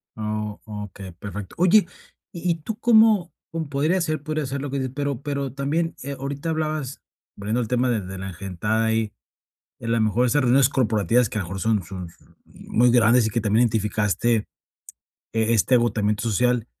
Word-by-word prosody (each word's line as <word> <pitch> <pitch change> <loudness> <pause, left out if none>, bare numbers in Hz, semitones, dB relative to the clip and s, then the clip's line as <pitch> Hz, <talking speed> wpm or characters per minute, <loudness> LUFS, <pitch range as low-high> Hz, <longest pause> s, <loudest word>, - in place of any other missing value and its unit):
Ah, 105 -1 -3
o 105 -1 -6
okey, 95 -1 -10
perfecto. 100 +2 -8
Oye, 185 +4 +5 0.5
¿y 175 +1 -1
y 165 - +1
tú 205 +7 -6
cómo?, 220 -6 +5 0.2
mm, 165 0 -2
podría 150 +6 +1
ser 155 -3 -1
podría 155 -1 -2
ser 135 +1 -4
lo 145 - -4
que 140 - -2
dices. 130 -1 -3
Pero 140 -3 -2
pero 140 -3 -3
también, 150 +5 -1
eh, 140 +1 -4
ahorita 140 +4 -4
hablabas, 155 -4 -2 0.3
volviendo 110 +4 -1
el 115 - -3
tema 125 +2 +1
de 115 -3 +1
de 95 +1 -7
la 95 +1 -5
engentada 100 +5 -2
ahí, 110 -1 0 0.7
a - - -7
la 115 0 +1
mejor 110 +3 +2
esas 145 +4 +2
reuniones 130 +1 +4
corporativas 115 -2 +2
que, 105 - -3
a - - -1
lo - - -7
mejor 95 +1 -5
son 110 -2 +1
son 90 0 -7
son - - -24
muy 125 +1 +1
grandes 120 0 +5
y 110 - -1
que 115 - 0
también 110 +2 +3
identificaste, 110 0 +1 1.0
eh, 115 0 +1
este 115 +4 +3
agotamiento 105 -3 +1
social. 120 +1 +1
120 Hz, 195 wpm, -23 LUFS, 105-140 Hz, 1.0 s, Oye